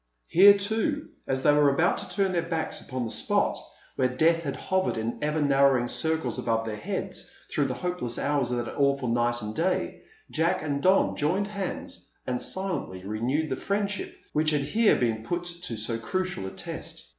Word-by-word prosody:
Here, 200 +4 +8
too, 225 +9 -1 0.2
as 130 0 -1
they 145 - +6
were 145 -1 +5
about 160 +6 +2
to - - -7
turn 195 -2 +1
their 175 -2 +1
backs 165 -1 -2
upon 130 -2 -4
the 110 - -4
spot - - +1 0.4
where 130 - +3
death 160 +6 +2
had 140 -4 -3
hovered 190 -6 0
in 110 +1 -3
ever 150 +1 0
narrowing 140 -3 +4
circles 160 0 -1
about 115 -2 0
their 110 -1 -3
heads 105 - -5 0.2
through - - +1
the - - -2
hopeless 180 -10 -2
hours 140 -3 +1
of 120 -1 -1
that - - -6
awful 140 -3 +1
night 120 0 +1
and 105 0 -4
day, 180 +3 -1 0.3
Jack 170 +2 +1
and 140 -2 -1
Don 190 +4 +4
joined 180 +7 +1
hands 200 -3 -5 0.2
and 125 -1 -2
silently 180 - -4
renewed 125 +9 -1
the - - +1
friendship 200 +3 -2 0.2
which 155 +1 +2
had 150 -2 +1
here 210 +11 +3
been 115 -3 0
put 175 +10 -2
to 175 -8 -5
so 115 +2 -2
crucial 180 - -2
a - - -6
test. - - -8
150 Hz, 190 wpm, -27 LUFS, 120-180 Hz, 0.4 s, Here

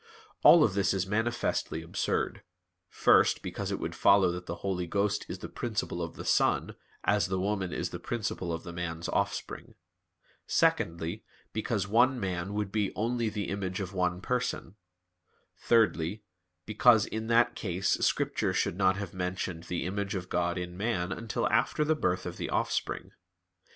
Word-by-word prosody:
All 170 -2 +8
of 105 - +2
this 100 0 +1
is 95 -1 0
manifestly 110 -5 -1
absurd; 80 - -1 0.5
first, - - +4
because - - -4
it - - -1
would - - -4
follow 100 -2 +5
that 90 0 -6
the 85 - -3
Holy 90 -2 -1
Ghost 100 +3 0
is - - -4
the - - -7
principle 105 -6 -3
of 85 -1 -5
the - - -8
Son, - - +2 0.3
as 100 -3 +2
the 95 0 -1
woman 95 -2 -1
is - - -3
the - - -5
principle 105 -6 -3
of 80 0 -4
the 85 - -8
man's 85 -1 -4
offspring; - - -3 0.7
secondly, 85 +5 +1 0.3
because 110 -2 -1
one 125 +4 +3
man 95 0 -3
would 105 -2 -2
be 105 -2 0
only 115 +1 0
the 105 -3 -4
image 95 -1 -3
of 95 -1 -5
one 90 -1 0
Person; 125 -6 -2 0.8
thirdly, 105 -4 +2 0.4
because 110 0 +5
in 110 0 -4
that 120 +1 +4
case 95 -1 -2
Scripture - - +1
should - - 0
not 95 -1 +3
have 100 -3 -5
mentioned 90 -2 -3
the 85 -2 -3
image 100 +1 -2
of 90 -1 -5
God 90 0 0
in 90 0 -5
man 95 -3 -1
until 115 +3 -2
after 150 - +2
the 155 - +3
birth 90 - -1
of - - -5
the - - -4
offspring. - - -1
95 Hz, 165 wpm, -29 LUFS, 90-110 Hz, 0.8 s, All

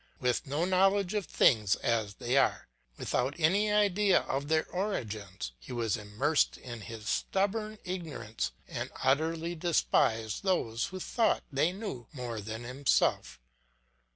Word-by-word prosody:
With 125 +1 0
no 145 +5 0
knowledge 195 +1 +3
of 210 -3 -1
things 105 -5 +4
as 110 -3 -1
they 120 +4 -1
are, 135 - +2 0.3
without 135 +3 -1
any 200 +7 +3
idea 205 -1 +4
of 140 +2 -3
their 155 +1 +2
origins, 105 - -3
he - - -11
was 115 -4 0
immersed 110 +9 +1
in 120 -3 -8
his 110 0 -8
stubborn 215 - 0
ignorance 140 - -4 0.2
and - - -4
utterly 160 +5 +1
despised 115 - +1
those 120 - 0
who 185 - -6
thought 230 +4 +1
they 145 +5 +2
knew 185 - -6
more 120 -5 -5
than 110 +3 -6
himself. 125 - +1
140 Hz, 135 wpm, -31 LUFS, 115-185 Hz, 0.3 s, things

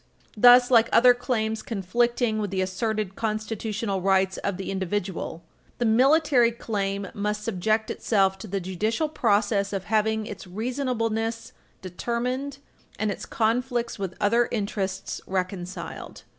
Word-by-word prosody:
Thus, 245 +3 +7
like 230 -2 +5
other 245 +1 +7
claims 225 -3 -2
conflicting 230 +2 0
with 205 -1 -2
the 190 0 -1
asserted 205 +1 -2
constitutional 215 -2 -2
rights 190 0 +2
of 200 -2 -3
the 195 - -4
individual, 190 -3 -3 0.3
the 240 - 0
military 255 +1 +4
claim 200 -4 -3
must 210 +1 -2
subject 215 +1 0
itself 195 -3 +1
to 215 - -8
the 195 0 -2
judicial 210 - -1
process 205 -6 +1
of 195 -2 -3
having 220 +1 +1
its 210 -3 -8
reasonableness 230 +1 -2 0.3
determined 250 +8 -3 0.4
and 215 0 0
its - - -6
conflicts 235 +1 -1
with 190 -2 -4
other 230 +3 +3
interests 200 -3 -3
reconciled. 185 0 -5
215 Hz, 130 wpm, -25 LUFS, 195-235 Hz, 0.4 s, Thus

